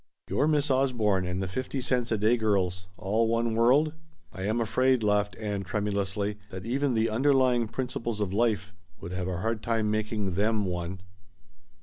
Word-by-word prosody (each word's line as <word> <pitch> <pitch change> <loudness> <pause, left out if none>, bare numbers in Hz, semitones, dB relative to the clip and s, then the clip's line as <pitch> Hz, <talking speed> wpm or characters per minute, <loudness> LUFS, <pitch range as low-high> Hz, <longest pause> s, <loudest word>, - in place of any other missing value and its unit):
"Your 145 - +2
Miss 150 -2 +2
Osborne 115 -8 +2
and 90 +1 -2
the - - -2
fifty 130 +8 -3
cents 125 -2 -1
a 110 - +2
day 110 +4 +3
girls 95 -5 0
all 110 +4 +1
one 115 0 +1
world? 130 +7 +4 0.4
I 95 0 -5
am 110 +3 0
afraid," 130 +2 +2
laughed 105 -1 +1
Ann 105 -3 -3
tremulously, 100 +1 -2
"that 95 +1 -7
even 135 +2 0
the 110 0 +2
'underlying 130 -1 +3
principles 120 -2 -3
of 100 -3 -1
life' 105 -3 0 0.3
would 85 - -7
have 90 0 -3
a 90 -2 -2
hard 110 0 -1
time 110 -2 0
making 105 -3 -1
them 105 +2 +1
one." 90 0 -4
110 Hz, 175 wpm, -28 LUFS, 100-120 Hz, 0.4 s, world